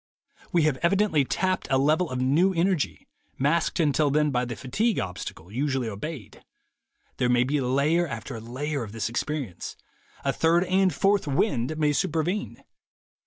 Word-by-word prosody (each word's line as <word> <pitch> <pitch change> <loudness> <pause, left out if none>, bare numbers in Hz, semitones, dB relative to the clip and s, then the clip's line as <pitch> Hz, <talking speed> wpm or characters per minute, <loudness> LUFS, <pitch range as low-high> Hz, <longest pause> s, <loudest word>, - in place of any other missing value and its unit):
We 170 -2 +3
have 150 -4 +2
evidently 175 -3 +2
tapped 185 +6 -1
a 135 - +3
level 155 +5 +2
of 130 - -3
new 160 +9 +3
energy, 175 -2 0 0.3
masked 155 +7 +1
until 150 -2 +3
then 150 +1 +2
by 125 -1 0
the 120 -1 -5
fatigue 205 - 0
obstacle 90 -1 -5
usually 130 0 -1
obeyed. 110 - -7 0.7
There 125 - +1
may 120 0 +4
be 140 +3 0
layer 140 +7 +2
after 115 -3 -6
layer 140 +5 -3
of 110 -3 -7
this 115 -1 -2
experience. 125 - -4 0.5
A - - +2
third 170 +2 +3
and 185 0 +2
fourth 195 +3 +2
'wind' 145 - 0
may 150 -1 +2
supervene. 165 +8 -1
145 Hz, 155 wpm, -26 LUFS, 125-170 Hz, 0.7 s, may